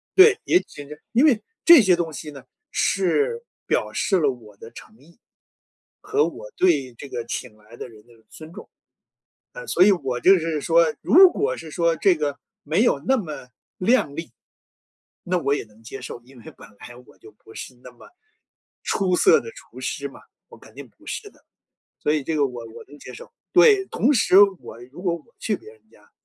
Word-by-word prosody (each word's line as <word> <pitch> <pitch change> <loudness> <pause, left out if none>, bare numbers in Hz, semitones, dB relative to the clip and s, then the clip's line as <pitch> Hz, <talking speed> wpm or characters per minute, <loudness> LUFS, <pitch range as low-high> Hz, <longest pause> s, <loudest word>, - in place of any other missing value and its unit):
对， 395 +2 +7
也 355 - +4
许 145 -1 -11 0.2
因 245 +5 +3
为 260 -9 +4 0.3
这 335 -7 +9
些 185 -3 +4
东 170 -2 -3
西 150 0 -8
呢， 135 -3 -12 0.3
是 435 - 0 0.2
表 - - -1
示 195 - 0
了 145 -4 +2
我 110 -5 -14
的 115 - -13
诚 110 - -15
意， 160 - -23 0.8
和 425 +1 0
我 - - -10
对 140 -9 +1
这 140 - -10
个 120 - -5
请 120 -1 -6
来 110 +2 -17
的 - - -8
人 110 -2 -17
的 120 - -20
尊 155 0 -13
重。 215 - -11 0.9
呃， - - -9
所 - - -1
以 200 +2 +7
我 135 -9 -2
就 190 +9 +6
是 160 -3 -3
说， 165 0 +2
如 365 +2 +6
果 440 +4 -2
是 160 - -10
说， 170 +1 0
这 190 0 +3
个 145 -2 -3 0.2
没 160 +9 0
有 240 - +2
那 265 0 +1
么 155 - -7 0.3
亮 185 - +1
丽， 165 +1 -7 0.9
那 180 +1 0
我 140 0 0
也 - - -2
能 110 +1 -23
接 125 +4 -9
受。 120 - -8
因 130 0 -17
为 - - -18
本 - - -14
来 120 - -12
我 - - -21
就 110 - -16
不 110 +2 -19
是 125 - -9
那 125 - -12
么 125 - -18 0.7
出 185 -2 0
色 - - +5
的 460 - -10
厨 - - -15
师 - - -4
嘛， - - -15 0.3
我 - - -15
肯 - - -18
定 - - -12
不 - - -26
是 415 - -6
的， - - -28 0.5
所 150 - 0
以 150 -2 -1
这 160 - -3
个 145 -2 +2
我 120 -2 -9
我 - - -11
能 145 +2 -15
接 125 - -12
受。 - - -12 0.2
对， 410 -4 +5
同 275 - 0
时 205 -6 +4 0.2
我 115 - -12
如 140 +8 -14
果 175 -3 0
我 170 +8 -17
去 215 - -2
别 430 - -14
人 450 - -23
家， - - -24
165 Hz, 220 characters per minute, -22 LUFS, -, 0.9 s, 这